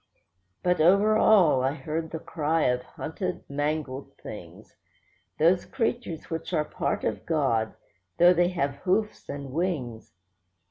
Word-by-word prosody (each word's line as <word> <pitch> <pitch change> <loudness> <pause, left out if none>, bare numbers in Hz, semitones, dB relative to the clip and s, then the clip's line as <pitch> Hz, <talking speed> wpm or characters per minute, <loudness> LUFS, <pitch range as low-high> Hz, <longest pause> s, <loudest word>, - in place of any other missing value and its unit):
But 180 -2 +2
over 200 +6 +5
all 180 -12 +5
I 135 +1 +1
heard 160 0 -4
the 160 - -4
cry 160 0 -1
of 125 0 +2
hunted, 180 +7 -5
mangled 145 -1 -3
things; - - -11 0.6
Those 175 +3 +4
creatures 235 - -3
which 165 +2 -4
are 155 -2 +1
part - - -2
of - - -2
God, 130 -9 0 0.4
though 175 +1 +7
they 175 0 +3
have 140 -6 -2
hoofs 210 +3 -1
and 140 -2 -6
wings. 135 - -3
160 Hz, 135 wpm, -27 LUFS, 140-180 Hz, 0.6 s, though